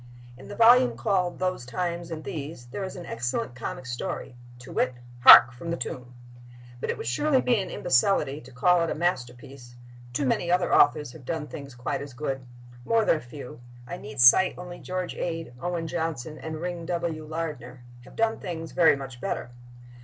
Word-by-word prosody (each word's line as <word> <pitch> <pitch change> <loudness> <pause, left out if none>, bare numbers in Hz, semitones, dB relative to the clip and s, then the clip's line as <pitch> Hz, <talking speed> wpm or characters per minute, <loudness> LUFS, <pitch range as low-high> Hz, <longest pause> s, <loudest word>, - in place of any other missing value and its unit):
In 130 - -13
the 205 - -8
volume 245 +3 +6
called 185 -5 0
"Those 185 -7 -2
Times 170 +5 -3
and 160 -2 -6
These" 145 -4 -6
there 200 - -4
is 190 - -6
an 175 -2 -8
excellent 120 +1 -3
comic 130 +1 -6
story, 125 0 -5 0.2
to 125 +1 -12
wit, 125 -1 0 0.2
"Hark, 120 0 +10
From 150 +8 -8
the 170 - -1
Tomb!" 125 -5 -6 0.6
But - - -4
it - - -1
would - - -6
surely 260 - +2
be 240 -5 +2
an 190 - -6
imbecility 150 -2 +1
to 130 - -14
call 175 +8 +3
it 165 - 0
a - - -2
masterpiece; 125 -5 -4 0.4
too 135 +3 -1
many 170 +6 0
other 180 0 +2
authors 150 -4 +4
have 145 0 -13
done 160 +3 -3
things 140 -3 -9
quite 125 +2 -3
as 140 -3 -9
good; 135 -2 -4 0.4
more 225 - +2
than - - +3
a - - -8
few 125 -1 -10 0.3
(I 175 - -6
need 140 -3 -9
cite 125 +10 +7
only 180 0 -8
George 185 -1 -4
Ade, 165 -5 -4
Owen 175 -2 -2
Johnson 160 -3 -4
and 160 -1 -6
Ring 175 -1 -5
W. 170 -3 -2
Lardner) 150 -6 -6 0.2
have - - -15
done 225 0 +1
things 165 -2 -6
very 170 -4 +5
much 135 -3 -9
better. 120 - -3
155 Hz, 190 wpm, -26 LUFS, 125-175 Hz, 0.6 s, Hark